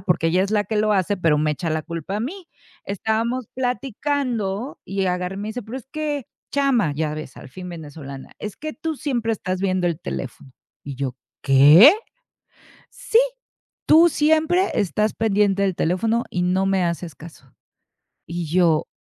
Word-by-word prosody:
porque 175 Hz, -3 st, +1 dB
ella 180 Hz, +3 st, +2 dB
es 195 Hz, -, -2 dB
la 210 Hz, -1 st, +2 dB
que 220 Hz, -, -4 dB
lo 215 Hz, 0 st, +2 dB
hace, 200 Hz, +1 st, +1 dB
pero 165 Hz, -5 st, +2 dB
me 150 Hz, 0 st, +1 dB
echa 165 Hz, +1 st, -3 dB
la 155 Hz, 0 st, -1 dB
culpa 170 Hz, +4 st, -5 dB
a 210 Hz, -, -2 dB
mí. 350 Hz, -, -5 dB, 0.4 s
Estábamos 225 Hz, +5 st, -1 dB
platicando 250 Hz, -3 st, -2 dB
y 195 Hz, -1 st, -2 dB
agarra 180 Hz, +1 st, -2 dB
y -, -, -5 dB
me 210 Hz, +2 st, -4 dB
dice: 240 Hz, +2 st, -5 dB
"Pero 225 Hz, +5 st, -7 dB
es 255 Hz, -, -15 dB
que 300 Hz, -4 st, -3 dB, 0.3 s
chama", 260 Hz, -, +2 dB
ya 150 Hz, 0 st, -2 dB
ves 155 Hz, -3 st, -8 dB
al -, -, -11 dB
fin 180 Hz, +6 st, -8 dB
venezolana, 145 Hz, -5 st, -9 dB
"es 210 Hz, -1 st, -6 dB
que 310 Hz, +1 st, -5 dB
tú 315 Hz, 0 st, -4 dB
siempre 250 Hz, -6 st, -1 dB
estás 185 Hz, -3 st, -3 dB
viendo 185 Hz, -2 st, +1 dB
el 170 Hz, -1 st, -3 dB
teléfono" 130 Hz, 0 st, -6 dB, 0.3 s
y 140 Hz, -2 st, -6 dB
yo: 130 Hz, -2 st, -3 dB, 0.3 s
"¿Qué?", 150 Hz, -, +8 dB, 1.0 s
"Sí, -, -, +1 dB, 0.7 s
tú 330 Hz, +2 st, +7 dB
siempre 315 Hz, +5 st, +2 dB
estás 210 Hz, +2 st, 0 dB
pendiente 205 Hz, -2 st, +2 dB
del 190 Hz, -2 st, +1 dB
teléfono 225 Hz, +8 st, 0 dB
y 180 Hz, -, -1 dB
no 185 Hz, +2 st, +1 dB
me 195 Hz, -2 st, +2 dB
haces 170 Hz, -2 st, -3 dB
caso". 155 Hz, -5 st, -14 dB, 0.8 s
Y 170 Hz, 0 st, -4 dB
yo: 165 Hz, -1 st, +2 dB
195 Hz, 175 wpm, -22 LUFS, 170-245 Hz, 1.0 s, Qué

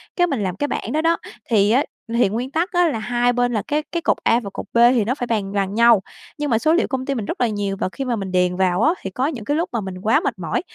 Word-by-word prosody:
Cái 355 Hz, -1 st, +3 dB
mình 265 Hz, -, -2 dB
làm 185 Hz, -1 st, -2 dB
cái 290 Hz, -, -2 dB
bảng -, -, -4 dB
đó 310 Hz, -, +1 dB
đó, 330 Hz, +1 st, +2 dB, 0.3 s
thì 210 Hz, -2 st, +3 dB
á, 260 Hz, +5 st, +4 dB, 0.3 s
thì 235 Hz, -4 st, +3 dB
nguyên 240 Hz, +6 st, -3 dB
tắc 340 Hz, +7 st, -1 dB
á 350 Hz, -2 st, +3 dB
là 225 Hz, -7 st, -2 dB
hai 245 Hz, +2 st, +1 dB
bên 245 Hz, 0 st, +1 dB
là 215 Hz, -, 0 dB
cái 300 Hz, +1 st, 0 dB
cái 340 Hz, -, -2 dB
cột -, -, +1 dB
A 230 Hz, -, +3 dB
và 205 Hz, -5 st, -7 dB
cột -, -, -6 dB
B -, -, +1 dB, 0.2 s
thì 235 Hz, -, +2 dB
nó 250 Hz, -, 0 dB
phải 245 Hz, -, -4 dB
bàn 210 Hz, -4 st, -1 dB
bằng 195 Hz, -1 st, -1 dB
nhau, 230 Hz, -2 st, +5 dB, 0.4 s
nhưng 295 Hz, -1 st, -2 dB
mà 225 Hz, -, +3 dB
số 310 Hz, +5 st, +2 dB
liệu 350 Hz, -, +2 dB
công 260 Hz, -1 st, -3 dB
ty 275 Hz, -, -1 dB
mình 225 Hz, -5 st, -3 dB
rất -, -, -4 dB
là 245 Hz, -, +4 dB
nhiều 205 Hz, -2 st, -2 dB
và -, -, -1 dB
khi 270 Hz, +5 st, -5 dB
mà 245 Hz, -, 0 dB
mình 195 Hz, -3 st, -5 dB
điền 180 Hz, -1 st, +2 dB
vào 185 Hz, +1 st, +1 dB
á, 320 Hz, +6 st, +4 dB
thì 195 Hz, -, -4 dB
có 250 Hz, +8 st, -1 dB
những 255 Hz, -9 st, -5 dB
cái 290 Hz, +5 st, 0 dB
lúc 335 Hz, -, -1 dB
mà 230 Hz, -, -1 dB
mình 190 Hz, -1 st, -6 dB
quá 220 Hz, +3 st, +3 dB
mệt -, -, -3 dB
mỏi, 170 Hz, -, -1 dB
235 Hz, 320 wpm, -21 LUFS, 200-285 Hz, 0.4 s, nhau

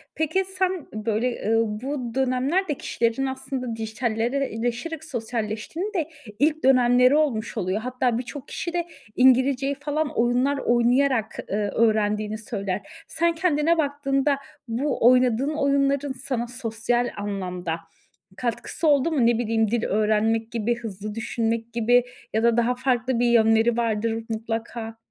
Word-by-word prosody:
Peki 320 Hz, +5 st, +1 dB, 0.2 s
sen, 370 Hz, -4 st, 0 dB
böyle, 220 Hz, +1 st, -1 dB
ııı, 225 Hz, -1 st, +1 dB
bu 260 Hz, -4 st, -4 dB
dönemler 265 Hz, +8 st, +1 dB
de 295 Hz, -, 0 dB
kişilerin 235 Hz, 0 st, -1 dB
aslında 265 Hz, -3 st, -4 dB
dijitalleşerek 240 Hz, +6 st, -2 dB
sosyalleştiğinin 235 Hz, -, -4 dB
de 325 Hz, -4 st, -1 dB, 0.3 s
ilk 305 Hz, +1 st, +2 dB
dönemleri 250 Hz, +1 st, +5 dB
olmuş 255 Hz, -8 st, 0 dB
oluyor. 185 Hz, +3 st, -1 dB
Hatta 250 Hz, -1 st, 0 dB
birçok 260 Hz, +3 st, -7 dB
kişi 340 Hz, -, -4 dB
de 345 Hz, -1 st, -1 dB, 0.3 s
İngilizceyi 260 Hz, +2 st, +4 dB
falan 290 Hz, +2 st, -2 dB
oyunlar 250 Hz, +4 st, +2 dB
oynayarak, 240 Hz, -1 st, +2 dB
eee, 200 Hz, -, -1 dB
öğrendiğini 215 Hz, -1 st, +1 dB
söyler. 200 Hz, -3 st, -3 dB, 0.3 s
Sen 335 Hz, +1 st, 0 dB
kendine 325 Hz, -1 st, +2 dB
baktığında 280 Hz, -1 st, +1 dB, 0.3 s
bu 245 Hz, +1 st, +1 dB
oynadığın 255 Hz, +3 st, +3 dB
oyunların 280 Hz, -1 st, +1 dB
sana 250 Hz, -2 st, -3 dB
sosyal 240 Hz, 0 st, -1 dB
anlamda 180 Hz, -4 st, -3 dB, 0.6 s
katkısı 250 Hz, +6 st, -2 dB
oldu 285 Hz, +2 st, +4 dB
mu? 250 Hz, -6 st, +3 dB
Ne 235 Hz, -1 st, +3 dB
bileyim 225 Hz, -2 st, +1 dB
dil 235 Hz, -1 st, 0 dB
öğrenmek 220 Hz, +2 st, +1 dB
gibi 235 Hz, +1 st, 0 dB
hızlı 210 Hz, -2 st, -6 dB
düşünmek 230 Hz, 0 st, -2 dB
gibi 240 Hz, +1 st, +3 dB, 0.3 s
ya 220 Hz, +1 st, +1 dB
da 235 Hz, 0 st, +3 dB
daha 240 Hz, +1 st, +2 dB
farklı 250 Hz, -1 st, 0 dB
bir 245 Hz, -, +3 dB
yönleri 225 Hz, 0 st, +4 dB
vardır 225 Hz, 0 st, -1 dB
mutlaka. 225 Hz, 0 st, -4 dB
240 Hz, 130 wpm, -24 LUFS, 225-275 Hz, 0.6 s, dönemleri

